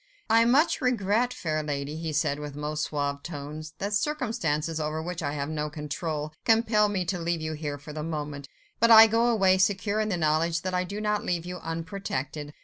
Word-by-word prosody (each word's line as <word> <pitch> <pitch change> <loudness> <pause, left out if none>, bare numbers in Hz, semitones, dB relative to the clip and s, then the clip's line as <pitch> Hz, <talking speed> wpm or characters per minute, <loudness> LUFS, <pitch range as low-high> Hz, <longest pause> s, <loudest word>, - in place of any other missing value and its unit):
"I 230 +1 +6
much 275 +8 +3
regret, 240 -1 +1
fair 155 -8 -2
lady," 145 0 -3
he 160 0 -4
said 145 -1 0
in - - -6
his 145 -1 -7
most 150 +1 -2
suave 140 -1 -2
tones, 155 0 -7
"that 200 +1 -3
circumstances, 205 - -1
over 155 0 -2
which 170 +1 -4
I 145 -2 -2
have 140 -1 -3
no 150 -1 -2
control, 150 0 -4
compel 220 -2 +3
me 190 -3 -1
to 180 +1 -2
leave 170 0 -1
you 155 0 -3
here 150 -2 -4
for 145 +1 -10
the 155 - -4
moment. 150 -3 -5 0.3
But 230 - +4
I 225 -1 +11
go 225 +2 +2
away, 195 -5 +4
secure 200 +2 +1
in 215 0 0
the 185 - 0
knowledge 165 +1 +1
that 185 0 -2
I 180 0 +1
do 200 +4 -5
not 210 0 0
leave 175 -1 -1
you 180 0 -6
unprotected. 165 -4 -4
165 Hz, 210 wpm, -27 LUFS, 150-205 Hz, 0.3 s, I